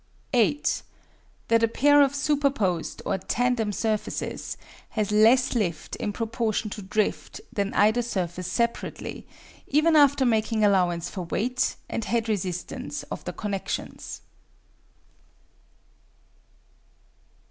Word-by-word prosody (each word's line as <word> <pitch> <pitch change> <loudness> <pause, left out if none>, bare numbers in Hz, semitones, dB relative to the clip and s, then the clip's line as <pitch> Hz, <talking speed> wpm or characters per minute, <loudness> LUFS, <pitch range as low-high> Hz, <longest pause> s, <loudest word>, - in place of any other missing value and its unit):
8. 250 +5 +2 0.7
That 230 0 +4
a 230 - +4
pair 290 +5 +5
of 280 0 +3
superposed, 275 - 0
or 190 - 0
tandem, 245 -3 0
surfaces 215 +1 -2 0.3
has 210 -2 -1
less 230 +5 +5
lift 180 -10 -2
in 205 - -2
proportion 220 -1 -2
to 210 - -6
drift 205 +2 -2
than 200 0 -1
either 220 +4 +4
surface 180 -6 -3
separately, 235 +3 -2 0.4
even 310 +3 +3
after 285 -2 +5
making 220 -2 +2
allowance 180 -4 +2
for 180 -1 -5
weight 250 +9 0
and 230 - -3
head 230 -1 0
resistance 185 -4 -3
of - - -5
the - - -4
connections. 200 -2 -4
220 Hz, 110 wpm, -26 LUFS, 200-245 Hz, 0.7 s, pair